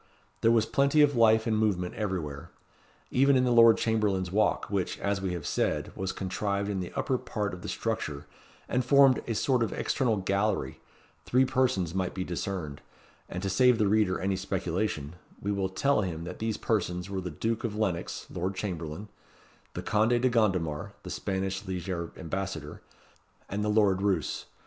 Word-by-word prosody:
There 115 - +4
was 115 -1 +4
plenty 140 +6 +3
of 145 -2 +3
life 110 -1 +5
and 110 - +1
movement 100 -5 0
everywhere. 90 -9 -4 0.6
Even 135 +2 +4
in 130 - +4
the 125 - +2
Lord 115 -1 +7
Chamberlain's 105 -5 0
walk, 105 +2 +2
which, 100 -3 -2
as 100 -1 -1
we 95 -2 -2
have 85 -4 -5
said, - - -1
was 95 0 -2
contrived 100 +2 -2
in 95 - -2
the 90 - -5
upper 130 -2 0
part 105 -4 -3
of 90 - -7
the - - -6
structure, 80 -11 -3 0.4
and 125 - 0
formed 135 0 +5
a 115 - -1
sort 130 +2 +2
of 115 - 0
external 120 -5 0
gallery, 100 -7 -1 0.5
three 130 +2 +4
persons 130 -10 +1
might 95 -1 -2
be 95 - -2
discerned; 85 -5 -4 0.5
and 90 +2 -5
to 100 - 0
save 125 +4 +5
the 110 - +2
reader 100 -2 +2
any 95 +1 0
speculation, 90 -4 -2 0.2
we 100 - -2
will 100 -2 -1
tell 140 +6 +2
him 85 -4 -4
that 85 - -7
these 110 -1 -1
persons 90 -5 -1
were 95 -1 -3
the 90 - -4
Duke 110 +8 -2
of 110 -3 -2
Lennox 100 -6 -2
(Lord 95 +2 -2
Chamberlain), 90 -1 -4 0.7
the - - -4
Conde 110 +3 +2
de 130 +1 +3
Gondomar 95 -10 0
(the - - -7
Spanish 95 0 -2
lieger 90 -3 -4
ambassador), 90 -4 -5 0.7
and 105 +1 -3
the 105 - 0
Lord 105 -3 +3
Roos. 95 -6 0
100 Hz, 180 wpm, -29 LUFS, 90-110 Hz, 0.7 s, Lord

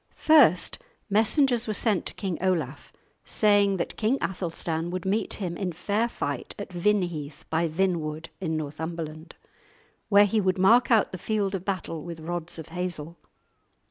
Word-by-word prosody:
First, 290 - +4 0.3
messengers 235 +3 +3
were 215 - 0
sent 210 -5 +1
to - - -5
King 190 -4 -3
Olaf, 185 -3 -1 0.3
saying 205 -2 +3
that 170 - -4
King 230 +5 +1
Athelstan 170 -2 -3
would 185 0 -4
meet 200 +2 0
him 180 -4 -4
in 185 0 -2
fair 205 +7 0
fight 145 - -4
at 200 -2 -7
Vinheath 175 -6 -1
by 165 +1 +2
Vinwood, 160 -2 -1
in 160 -4 -2
Northumberland, 155 +1 -6 0.7
where 205 -1 +7
he 210 +2 +1
would 185 -1 +1
mark 230 +6 +5
out 225 -4 +4
the 185 - -6
field 205 -1 -1
of 190 -2 -3
battle 185 -5 -3
with 170 0 -7
rods 170 +1 -4
of 160 -1 -8
hazel. 170 -2 -5
185 Hz, 155 wpm, -26 LUFS, 165-205 Hz, 0.7 s, where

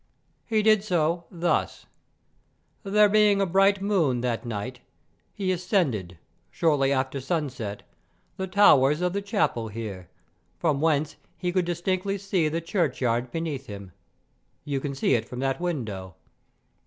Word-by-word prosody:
He 220 -2 +1
did 215 -2 +4
so 170 -3 0
thus: 175 0 -1 1.0
There 210 0 +4
being 210 -1 +4
a 195 - +3
bright 195 +2 +3
moon 165 - +1
that 120 0 -2
night, 120 +3 -5 0.5
he 190 -2 -2
ascended, 165 - -1 0.3
shortly 145 -4 +2
after 130 0 -1
sunset, 130 - -3 0.5
the 190 - -4
towers 150 -6 +5
of 180 0 0
the 200 - -1
chapel 200 - 0
here, 100 -5 -7 0.5
from 150 -4 0
whence 155 -2 +1 0.2
he 180 -1 -2
could 180 -1 +1
distinctly 185 +3 -1
see 190 -5 0
the 165 +2 -2
churchyard 130 - 0
beneath 155 -5 -4
him; 100 -2 -9 0.7
you 140 -2 -1
can 140 0 -4
see 135 - +1
it 115 - 0
from 125 - -7
that 135 +4 -1
window. 110 - -4
160 Hz, 140 wpm, -26 LUFS, 125-190 Hz, 1.0 s, towers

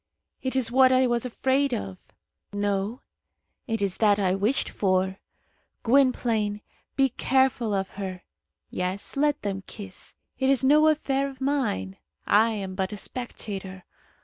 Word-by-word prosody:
It 260 0 -2
is 245 -3 +2
what 260 +1 +6
I 260 0 +4
was 240 0 0
afraid 265 +2 +1
of. 95 -1 -6 0.5
No; 205 +3 -1 0.7
it 225 -3 -1
is 195 -2 -1
that 210 -2 +4
I 190 -3 +1
wished 210 +8 +1
for. 190 -1 0 0.6
Gwynplaine, 230 -5 +2 0.3
be 270 -1 +3
careful 260 -2 +1
of 195 0 -1
her. 185 -2 -5 0.5
Yes, 185 +2 -3
let 295 +1 +1
them 195 -1 -2
kiss; 195 -3 -9 0.2
it 265 -1 +2
is 270 -1 +3
no 300 +3 +5
affair 275 -3 +1
of 265 -1 -13
mine. 260 - -1 0.3
I 220 +3 +4
am 200 -4 -4
but 190 0 -2
a 210 - -5
spectator. 195 -5 -6
225 Hz, 145 wpm, -26 LUFS, 195-265 Hz, 0.7 s, what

